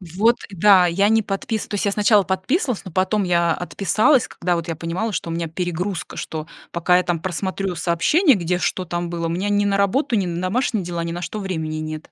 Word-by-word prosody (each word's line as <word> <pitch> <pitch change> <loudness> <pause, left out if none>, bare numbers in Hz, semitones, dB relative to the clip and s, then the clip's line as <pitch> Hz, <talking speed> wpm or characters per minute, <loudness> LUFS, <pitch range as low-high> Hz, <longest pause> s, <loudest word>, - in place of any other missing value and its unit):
Вот, 225 +5 +4
да! 190 -1 +5
Я 195 +4 +2
не 225 0 +4
подпис 210 +2 -3
то - - -10
есть 205 - -1
я 200 - +2
сначала 210 0 +4
подписывалась, 195 - -1
но 185 - -8
потом 190 +4 +1
я 170 -2 +2
отписалась, 215 - +2
когда 175 0 -1
вот 170 -1 -4
я 165 - -2
понимала, 170 +8 -3
что 170 -3 -3
у - - -3
меня 165 0 -2
перегрузка, 175 +2 -4
что 155 0 -5 0.2
пока 175 +1 +3
я 180 - +2
там 175 -2 -1
просмотрю 185 +1 -3
сообщения, 235 - +3
где, 175 -1 -1
что 180 +1 -1
там 175 0 -3
было, 170 -1 -3
у - - -1
меня 185 +5 -1
ни 205 0 +2
на 200 -1 +1
работу, 230 +7 +1
ни 200 -3 +1
на 170 -1 -3
домашние 205 +1 0
дела, 170 -1 -3
ни 170 - -3
на 175 +1 -5
что 215 - -5
времени 160 -6 -3
нет. 155 0 -6
185 Hz, 230 wpm, -21 LUFS, 170-205 Hz, 0.2 s, да